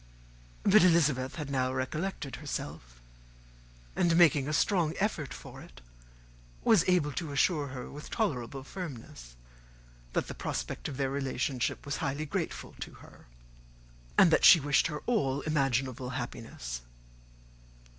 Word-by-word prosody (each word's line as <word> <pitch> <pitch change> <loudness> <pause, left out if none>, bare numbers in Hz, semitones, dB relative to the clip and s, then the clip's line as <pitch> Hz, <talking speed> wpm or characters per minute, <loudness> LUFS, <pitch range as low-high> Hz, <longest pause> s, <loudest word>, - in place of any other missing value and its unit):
But 200 0 +6
Elizabeth 150 -7 +3
had 150 -4 -5
now 130 -1 +1
recollected 140 +3 -3
herself; 75 - -6 1.0
and, 170 -2 +3
making 150 -5 +5
a - - -1
strong 165 +1 +2
effort 180 -9 -1
for - - -10
it, - - -14 0.8
was 210 -7 +5
able 170 -5 +3
to 155 +2 -4
assure 145 +1 +2
her, 130 -2 -7
with 150 +1 -9
tolerable 135 - -2
firmness, 120 - -8 0.8
that - - 0
the - - -5
prospect - - -4
of 135 - -6
their 135 -1 0
relationship 135 -2 -2
was 145 +1 -2
highly 140 +3 -2
grateful 145 - -4
to - - -7
her, - - -17 0.9
and 170 - +7
that - - +3
she 170 - +10
wished 145 +1 +2
her 150 -2 -6
all 145 - +1
imaginable 135 -4 0
happiness. 115 - -6
140 Hz, 135 wpm, -30 LUFS, 130-165 Hz, 1.0 s, she